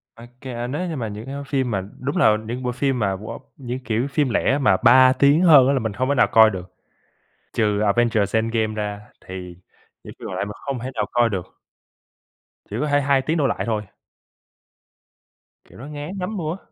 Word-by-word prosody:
Ô 115 Hz, -, -13 dB, 0.2 s
kê, 120 Hz, -2 st, -5 dB
nếu 150 Hz, +8 st, -3 dB
như 165 Hz, -, -4 dB
mà 120 Hz, -5 st, -3 dB
những 105 Hz, +1 st, -7 dB
cái 135 Hz, +1 st, -6 dB
phim 135 Hz, -3 st, -1 dB
mà 100 Hz, -3 st, -1 dB, 0.2 s
đúng 140 Hz, +2 st, -3 dB
là 110 Hz, -1 st, +4 dB
những 125 Hz, +3 st, -5 dB
bộ 125 Hz, -, -1 dB
phim 130 Hz, +1 st, -1 dB
mà, 100 Hz, -3 st, 0 dB
wow, 105 Hz, +4 st, -8 dB, 0.2 s
những 125 Hz, -1 st, -5 dB
kiểu 115 Hz, +1 st, -2 dB
phim 140 Hz, -1 st, 0 dB
lẻ 130 Hz, +3 st, +1 dB
mà 140 Hz, -, +3 dB
3 130 Hz, +1 st, +7 dB
tiếng 140 Hz, +4 st, +4 dB
hơn 150 Hz, -8 st, +7 dB
á 140 Hz, -, +3 dB
là 135 Hz, -, +1 dB
mình 110 Hz, -4 st, -3 dB
hông 130 Hz, +4 st, -1 dB
thể 140 Hz, -, +2 dB
nào -, -, +4 dB
coi 110 Hz, -1 st, +7 dB
được. 95 Hz, -2 st, -8 dB, 0.8 s
Trừ 105 Hz, -2 st, +1 dB
Avengers 105 Hz, 0 st, +1 dB
Endgame 110 Hz, -1 st, 0 dB
ra, 105 Hz, -1 st, -4 dB, 0.2 s
thì 90 Hz, -1 st, -8 dB, 0.5 s
những -, -, -10 dB
phim -, -, -7 dB
còn -, -, -5 dB
lại -, -, -2 dB
mình 105 Hz, -, -7 dB
hông 135 Hz, -3 st, -2 dB
thể 130 Hz, +3 st, -5 dB
nào 105 Hz, -, 0 dB
coi 120 Hz, -1 st, +3 dB
được. 95 Hz, -4 st, -6 dB, 1.1 s
Chỉ -, -, -5 dB
có 150 Hz, -, 0 dB
thể 145 Hz, 0 st, +2 dB
2 140 Hz, -1 st, +2 dB
tiếng 160 Hz, +5 st, -1 dB
đổ 140 Hz, -, +2 dB
lại -, -, -2 dB
thôi. 110 Hz, -2 st, -1 dB, 1.8 s
Kiểu, -, -, -18 dB
nó 135 Hz, -, -9 dB
ngán 150 Hz, +6 st, -7 dB
nắm 195 Hz, +3 st, -4 dB
nua. 160 Hz, +1 st, -3 dB
125 Hz, 215 wpm, -22 LUFS, 110-140 Hz, 1.8 s, 3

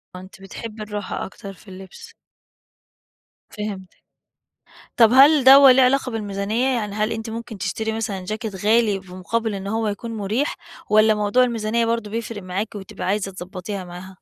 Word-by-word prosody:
آه -, -, -7 dB
أنتِ 190 Hz, +1 st, -15 dB
بتحبي 215 Hz, +2 st, -8 dB
الراحة 205 Hz, -2 st, -5 dB
أكتر 195 Hz, 0 st, -10 dB
في 195 Hz, -, -21 dB
اللبس. 190 Hz, 0 st, -12 dB, 1.4 s
فهمتِك. 200 Hz, -3 st, -7 dB, 1.0 s
طب 230 Hz, -2 st, +6 dB
هل 275 Hz, +1 st, +6 dB
دوّة 270 Hz, 0 st, +9 dB
ليه 260 Hz, +1 st, +4 dB
علاقة 255 Hz, -1 st, +2 dB
بالميزانيّة؟ 210 Hz, +3 st, -1 dB
يعني 210 Hz, -3 st, -3 dB
هل 215 Hz, +1 st, -1 dB
أنتِ 225 Hz, 0 st, -5 dB
ممكن 230 Hz, -2 st, -7 dB
تشتري 220 Hz, +3 st, -3 dB
مثلًا 205 Hz, -4 st, -4 dB
چاكيت 215 Hz, -1 st, -4 dB
غالي 220 Hz, -3 st, +3 dB
بمقابل 190 Hz, +4 st, -3 dB
إن 195 Hz, 0 st, -6 dB
هو 220 Hz, +1 st, -1 dB
يكون 230 Hz, +3 st, -5 dB
مريح، 215 Hz, +8 st, -1 dB, 0.3 s
والّا 215 Hz, 0 st, +5 dB
موضوع 210 Hz, +4 st, +2 dB
الميزانيّة 230 Hz, -1 st, -1 dB
برضه 230 Hz, -2 st, -2 dB
بيفرق 225 Hz, -2 st, -5 dB
معاكِ 195 Hz, +4 st, -4 dB
وبتبقى 190 Hz, -2 st, -7 dB
عايزة 195 Hz, 0 st, -1 dB
تضبّطيها 185 Hz, +1 st, -7 dB
معاها؟ 180 Hz, +2 st, -10 dB
215 Hz, 155 wpm, -22 LUFS, 195-230 Hz, 1.4 s, دوّة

